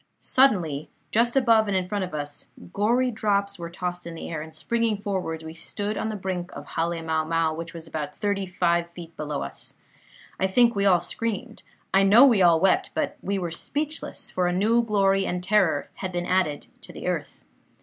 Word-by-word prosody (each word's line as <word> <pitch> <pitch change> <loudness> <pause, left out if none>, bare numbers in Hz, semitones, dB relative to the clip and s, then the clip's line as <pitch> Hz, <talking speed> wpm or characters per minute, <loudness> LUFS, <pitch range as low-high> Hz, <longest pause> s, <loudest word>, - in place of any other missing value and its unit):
"Suddenly, 180 - +2 0.2
just 235 +3 +2
above 230 -5 +4
and 200 -2 +1
in 185 -1 -1
front 200 +1 -1
of 180 -4 -5
us, 145 -1 -6 0.3
gory 240 +5 +2
drops 200 -3 0
were 170 0 -5
tossed 180 0 -5
in 170 - -7
the 165 - -7
air, 155 -2 -3
and 160 0 -9
springing 230 +4 0
forwards, 185 -5 -3
we 160 0 -7
stood 205 +5 -4
on 220 - -2
the 215 - -3
brink 185 -2 -4
of - - -9
Hale 170 +1 -1
mau 160 -1 0
mau, 165 0 +1
which 165 +1 -7
was 165 -1 -8
about 150 -2 -5
thirty 200 -2 -1
five 170 -1 +1
feet 170 -2 -10
below 150 -2 -3
us. - - -6 0.6
I 190 - +2
think 235 +4 +4
we 200 0 +1
all 180 -3 +5
screamed. 230 +1 -4 0.3
I 195 - +6
know 210 +7 +8
we 235 -8 +5
all 170 -2 +6
wept; 190 +1 +3
but - - -1
we 200 +1 -1
were 175 -3 -3
speechless, 300 - -4
for 180 -1 +1
a - - +1
new 220 +6 +3
glory 195 -3 +2
and 180 0 -2
terror 185 -6 +2
had 190 -1 -5
been 175 -1 -2
added 180 -5 0 0.2
to - - -10
the - - -8
earth. - - -3
185 Hz, 205 wpm, -25 LUFS, 170-210 Hz, 0.6 s, know